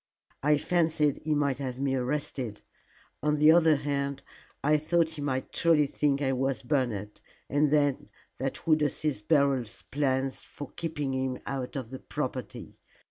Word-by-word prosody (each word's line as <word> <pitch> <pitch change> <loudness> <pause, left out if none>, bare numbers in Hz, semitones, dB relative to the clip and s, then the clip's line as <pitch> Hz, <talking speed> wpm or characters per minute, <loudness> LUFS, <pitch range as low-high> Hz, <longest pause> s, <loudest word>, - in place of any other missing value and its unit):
I 150 +1 +4
fancied 160 -3 +1
he 155 0 -1
might 140 -3 +1
have 130 -2 -4
me 135 -1 0
arrested. 130 -4 -2 0.6
On 150 0 +1
the 150 +1 +7
other 160 -2 +6
hand, 140 -1 -2 0.4
I 150 +2 +4
thought 165 +2 +1
he 155 -2 -7
might 130 -2 -2
truly 165 -3 +4
think 140 0 0
it 135 -2 +1
was 135 0 -1
Bernard, 120 -7 -1 0.3
and 145 +2 +2
then 145 -2 +2 0.3
that 135 +1 -3
would 155 -1 +4
assist 145 -5 -1
Beryl's 140 -7 +2
plans 135 -2 0
for 145 - -9
keeping 150 -5 -3
him 130 -1 -1
out 135 0 -4
of 130 -4 -5
the 130 - -6
property. - - -5
140 Hz, 155 wpm, -29 LUFS, 130-150 Hz, 0.6 s, the